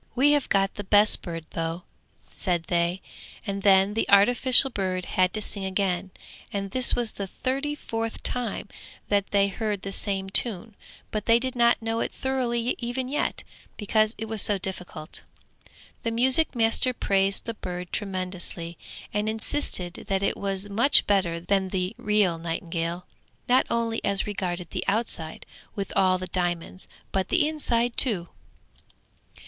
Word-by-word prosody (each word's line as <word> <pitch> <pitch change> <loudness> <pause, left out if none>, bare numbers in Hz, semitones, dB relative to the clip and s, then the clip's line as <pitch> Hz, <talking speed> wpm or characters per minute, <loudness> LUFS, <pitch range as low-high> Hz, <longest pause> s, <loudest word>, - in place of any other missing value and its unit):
'We 275 +4 +5
have 290 -2 +1
got 195 -1 +2
the 205 - -6
best 205 +2 +5
bird 165 -2 -6
though,' 165 +1 -3 0.5
said 175 -3 -1
they, 175 +1 0 0.4
and 200 -2 -3
then 195 0 +5
the 225 - -1
artificial 245 +6 +5
bird 185 -4 -2
had 185 0 +1
to 215 - -2
sing 200 -1 -3
again, 190 -1 -1 0.4
and 195 -1 -4
this 255 +1 +3
was 235 -2 +2
the 200 - -5
thirty 275 +8 -2
fourth 225 -5 -4
time 245 -6 0 0.4
that 200 -1 +1
they 200 -1 +3
heard 205 0 -3
the 195 - -4
same 195 -1 -1
tune, 220 0 +3 0.4
but 215 -1 -3
they 230 0 +6
did 255 +1 -3
not 235 -1 +3
know 225 0 -1
it - - -2
thoroughly 250 -2 -1
even 245 +1 -3
yet, 290 - -2 0.3
because 215 +1 +1
it 220 - -4
was 220 -2 +1
so 205 - +3
difficult. 180 -4 -6 0.8
The 230 - -1
music 260 +6 +4
master 230 +2 +2
praised 195 -2 +1
the 230 - -3
bird 180 -4 -6
tremendously, 185 -4 -3 0.3
and 210 +1 0
insisted 220 -6 -3
that 195 0 0
it - - +1
was 195 0 -3
much 230 +8 +5
better 185 -5 +1
than 190 +2 0
the 185 -1 -2
real 205 -5 +2
nightingale, 170 +1 -3 0.4
not 255 +1 +4
only 230 -1 -1
as 200 -1 0
regarded 180 -4 -4
the - - -3
outside 195 -7 -1 0.3
with 200 -1 -4
all 185 -1 +4
the 185 - -5
diamonds, 175 0 -3 0.2
but 190 -1 -1
the 320 -4 +3
inside 245 -6 +1
too. 190 -9 +3
200 Hz, 155 wpm, -26 LUFS, 185-230 Hz, 0.8 s, they